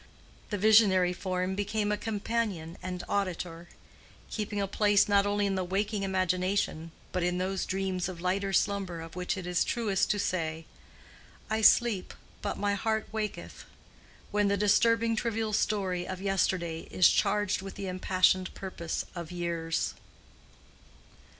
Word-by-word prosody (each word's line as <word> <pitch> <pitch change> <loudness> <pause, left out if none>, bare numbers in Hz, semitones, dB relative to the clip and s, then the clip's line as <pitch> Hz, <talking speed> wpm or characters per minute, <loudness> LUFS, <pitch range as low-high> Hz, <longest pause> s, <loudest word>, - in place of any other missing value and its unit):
The 205 - -2
visionary 195 -3 +5
form 185 0 -2
became 205 +1 -1
a - - +2
companion 210 -6 -2
and 180 -1 -5
auditor; 175 -3 -3 0.6
keeping 210 -1 -3
a 200 - +1
place 205 +1 +3
not 200 -1 +3
only 205 0 +1
in 200 - 0
the 190 -1 -1
waking 200 +3 -1
imagination, 185 -3 0 0.2
but 180 - -1
in 180 +1 0
those 190 +1 -2
dreams 190 -1 -1
of 180 -2 -7
lighter 195 +2 0
slumber 195 -3 0
of 165 +1 -10
which 180 +3 -2
it 185 - -5
is 180 -1 +1
truest 210 -5 0
to 210 - +2
say, 160 -5 -2 0.9
"I 220 0 +1
sleep, 220 -3 +4 0.3
but 205 - -3
my 205 0 0
heart 220 +2 -1
waketh"—when 210 -1 -5
the 200 0 +2
disturbing 230 +3 +3
trivial 220 -1 -1
story 190 -4 0
of 185 -1 -5
yesterday 185 -4 -1
is 185 - +5
charged 205 -2 +1
with 195 0 -8
the 195 - -5
impassioned 185 0 +2
purpose 175 -4 -4
of 170 -2 -7
years. 170 -2 -2
195 Hz, 145 wpm, -29 LUFS, 180-205 Hz, 0.9 s, visionary